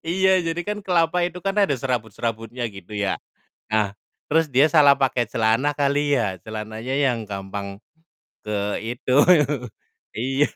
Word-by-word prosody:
iya, 190 Hz, +2 st, +3 dB
jadi 165 Hz, +1 st, -2 dB
kan 210 Hz, 0 st, -2 dB
kelapa 175 Hz, -1 st, +2 dB
itu 175 Hz, 0 st, -2 dB
kan 195 Hz, 0 st, 0 dB
ada 170 Hz, -8 st, +3 dB
serabut-serabutnya, 115 Hz, -1 st, -3 dB
gitu 100 Hz, +2 st, -11 dB
ya. 100 Hz, -1 st, -1 dB, 0.5 s
Nah, 105 Hz, -2 st, +1 dB, 0.4 s
terus 160 Hz, +1 st, +3 dB
dia 135 Hz, +4 st, +6 dB
salah 145 Hz, -3 st, +7 dB
pakai 130 Hz, -3 st, +1 dB
celana 115 Hz, +6 st, +1 dB
kali 145 Hz, 0 st, +1 dB
ya, 100 Hz, -5 st, -1 dB
celananya 110 Hz, +3 st, -6 dB
yang 125 Hz, -6 st, +1 dB
gampang 100 Hz, 0 st, -6 dB, 0.7 s
ke 105 Hz, -1 st, -1 dB
itu 125 Hz, +3 st, -1 dB, 1.0 s
iya. 135 Hz, +5 st, 0 dB
125 Hz, 135 wpm, -23 LUFS, 110-150 Hz, 1.0 s, salah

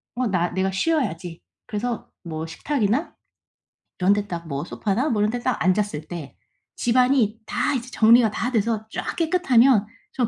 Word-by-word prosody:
'어 250 Hz, -1 st, 0 dB
나 175 Hz, -3 st, 0 dB
내가 190 Hz, +1 st, 0 dB
쉬어야지.' 190 Hz, -, -1 dB, 0.2 s
그래서 230 Hz, +2 st, -4 dB
뭐 160 Hz, -1 st, -5 dB
식탁이나 245 Hz, -, -1 dB, 0.9 s
이런 190 Hz, +3 st, +4 dB
데 205 Hz, 0 st, -2 dB
딱 170 Hz, -2 st, -6 dB
뭐 140 Hz, -1 st, -3 dB
소파나 215 Hz, -, -1 dB
뭐 210 Hz, -4 st, +1 dB
이런 210 Hz, -, +2 dB
데 245 Hz, -, -3 dB
딱 255 Hz, +1 st, -1 dB
앉았을 185 Hz, -5 st, 0 dB
때 150 Hz, -, -8 dB, 0.4 s
집안이 245 Hz, -2 st, +2 dB
다 -, -, 0 dB
이제 250 Hz, 0 st, -4 dB
정리가 225 Hz, 0 st, +5 dB
다 245 Hz, +4 st, -2 dB
돼서 220 Hz, -1 st, 0 dB
쫙 -, -, -4 dB
깨끗하면 270 Hz, -, +4 dB, 0.3 s
전 245 Hz, -4 st, 0 dB
215 Hz, 300 characters per minute, -23 LUFS, 185-250 Hz, 0.9 s, 정리가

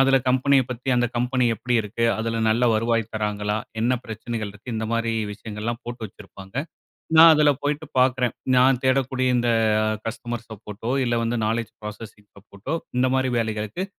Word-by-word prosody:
அதில 135 Hz, 0 st, +5 dB
கம்பெனிய 130 Hz, +2 st, +4 dB
பத்தி, 125 Hz, +1 st, -6 dB
அந்த 120 Hz, 0 st, +2 dB
கம்பெனி 125 Hz, +1 st, +1 dB
எப்படி 125 Hz, +3 st, -2 dB
இருக்கு? 110 Hz, +2 st, -3 dB
அதில 115 Hz, 0 st, -2 dB
நல்ல 115 Hz, +3 st, +2 dB
வருவாய் 115 Hz, 0 st, 0 dB
தராங்களா, 105 Hz, -1 st, -1 dB, 0.2 s
என்ன 120 Hz, +3 st, +2 dB
பிரச்சனைகள் 110 Hz, -1 st, -5 dB
இருக்கு? 110 Hz, +4 st, -9 dB
இந்த 110 Hz, -, -2 dB
மாதிரி 115 Hz, 0 st, 0 dB, 0.2 s
விஷயங்கள்லாம் 110 Hz, +3 st, -5 dB
போட்டு 120 Hz, 0 st, -7 dB
வச்சிருப்பாங்க. 95 Hz, -1 st, -14 dB, 0.6 s
நான் 165 Hz, 0 st, +10 dB
அதில 150 Hz, -1 st, +5 dB
போயிட்டு 150 Hz, +2 st, -2 dB
பாக்குறேன். 125 Hz, -2 st, +2 dB, 0.2 s
நான் 130 Hz, 0 st, +5 dB
தேடக்கூடிய 130 Hz, 0 st, +1 dB
இந்த 120 Hz, 0 st, +1 dB, 0.6 s
கஸ்டமர்ஸ் 120 Hz, +1 st, -5 dB
சப்போர்டோ, 110 Hz, +2 st, -7 dB
இல்ல 120 Hz, -1 st, 0 dB
வந்து, 115 Hz, +1 st, -1 dB
நாலெட்ஜ் 115 Hz, 0 st, -2 dB
புராசஸிங் 105 Hz, -1 st, -9 dB
சப்போர்டோ, 100 Hz, +8 st, -6 dB, 0.2 s
இந்த 130 Hz, +1 st, +3 dB
மாதிரி 130 Hz, -1 st, +1 dB
வேலைகளுக்கு 110 Hz, -, -2 dB
115 Hz, 155 wpm, -23 LUFS, 110-125 Hz, 0.6 s, நான்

